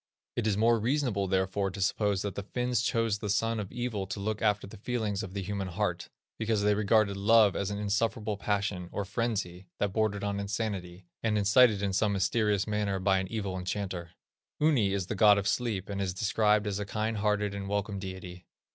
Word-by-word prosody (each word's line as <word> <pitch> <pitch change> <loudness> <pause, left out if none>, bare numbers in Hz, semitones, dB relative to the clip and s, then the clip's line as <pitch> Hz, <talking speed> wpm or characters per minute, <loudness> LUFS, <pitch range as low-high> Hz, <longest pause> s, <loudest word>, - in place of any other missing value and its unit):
It 115 -2 0
is 100 -2 +1
more 115 +1 +4
reasonable 120 -5 0
therefore 95 +1 0
to 95 +2 -8
suppose 100 0 +1
that 100 -2 -3
the 100 - -4
Finns 125 +3 -1
chose 115 -3 0
the 105 - -4
son 115 +2 +1
of 100 -2 -5
Evil 120 -5 -3
to 100 - -5
look 105 +1 -2
after 105 -2 +1
the 100 - -11
feelings 110 -3 -2
of 95 -3 -7
the 100 - -2
human 100 0 -3
heart, 90 -1 -2 0.3
because 110 -2 0
they 105 0 +4
regarded 105 0 +2
love 105 0 +5
as 100 -1 -1
an 100 - -3
insufferable 105 +1 -1
passion, 100 -3 -2
or 100 - -3
frenzy, 100 -4 -3
that 100 -2 -1
bordered 105 -2 0
on 100 0 -1
insanity, 100 -3 -4 0.2
and 110 -2 +1
incited 105 0 +5
in 100 -1 0
some 100 +1 +2
mysterious 105 0 +1
manner 105 -2 -1
by 95 0 +2
an 95 - -3
evil 100 -3 -3
enchanter. 90 -2 -4 0.5
Uni 140 -10 +3
is 100 -2 -1
the 95 - -3
god 105 0 +6
of 100 0 -1
sleep, 105 -3 -1
and 100 -1 -3
is 95 -2 -2
described 105 +1 +2
as 100 -1 -2
a 105 - -3
kind 110 +1 -2
hearted 105 -1 0
and 100 -1 -5
welcome 100 0 -2
deity. 95 -2 -8
100 Hz, 205 wpm, -29 LUFS, 95-110 Hz, 0.5 s, god